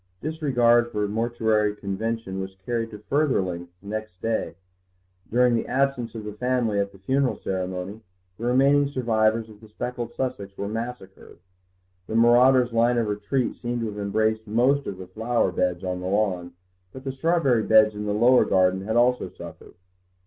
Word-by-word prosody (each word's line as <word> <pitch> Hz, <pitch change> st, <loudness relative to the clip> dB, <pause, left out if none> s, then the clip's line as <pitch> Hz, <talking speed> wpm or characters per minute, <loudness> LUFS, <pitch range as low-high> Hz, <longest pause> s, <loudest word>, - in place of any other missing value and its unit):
Disregard 120 Hz, -7 st, +2 dB
for 105 Hz, 0 st, -1 dB
mortuary 110 Hz, -1 st, 0 dB
convention 100 Hz, 0 st, -4 dB
was 95 Hz, 0 st, -6 dB
carried 115 Hz, -2 st, -2 dB
to 105 Hz, -, -9 dB
further 140 Hz, +6 st, +1 dB
lengths 90 Hz, 0 st, -5 dB
next 110 Hz, -2 st, -6 dB
day; 115 Hz, -5 st, -2 dB, 0.8 s
during 125 Hz, +1 st, +4 dB
the 115 Hz, -, -1 dB
absence 130 Hz, -3 st, -1 dB
of 110 Hz, -, -6 dB
the 105 Hz, 0 st, -6 dB
family 120 Hz, -2 st, 0 dB
at 100 Hz, 0 st, -1 dB
the 100 Hz, -, -16 dB
funeral 130 Hz, +7 st, 0 dB
ceremony 95 Hz, +2 st, -4 dB, 0.4 s
the 115 Hz, -, -4 dB
remaining 140 Hz, +3 st, +4 dB
survivors 115 Hz, -4 st, +1 dB
of 105 Hz, -1 st, -16 dB
the 110 Hz, -, -15 dB
speckled 120 Hz, +2 st, -5 dB
Sussex 100 Hz, -7 st, -4 dB
were 100 Hz, -, -3 dB
massacred. 115 Hz, -3 st, -7 dB, 0.7 s
The 110 Hz, -, -4 dB
marauder's 120 Hz, +1 st, +5 dB
line 120 Hz, +1 st, +3 dB
of 115 Hz, -3 st, 0 dB
retreat 105 Hz, +5 st, -1 dB
seemed 120 Hz, 0 st, -3 dB
to 115 Hz, -, -2 dB
have 105 Hz, -, -8 dB
embraced 110 Hz, +2 st, 0 dB
most 130 Hz, +6 st, +2 dB
of 95 Hz, -, -5 dB
the 95 Hz, -, -8 dB
flower 110 Hz, +2 st, 0 dB
beds 90 Hz, 0 st, -1 dB
on 90 Hz, -1 st, -3 dB
the 90 Hz, -, -5 dB
lawn, 95 Hz, -3 st, -1 dB, 0.4 s
but 130 Hz, -, -10 dB
the 135 Hz, -, -3 dB
strawberry 135 Hz, -4 st, +2 dB
beds 110 Hz, 0 st, +5 dB
in 105 Hz, 0 st, -5 dB
the -, -, 0 dB
lower 120 Hz, +4 st, +5 dB
garden 95 Hz, 0 st, +2 dB
had 110 Hz, +3 st, -3 dB
also 125 Hz, +1 st, +2 dB
suffered. -, -, -12 dB
110 Hz, 170 wpm, -24 LUFS, 100-125 Hz, 0.8 s, marauder's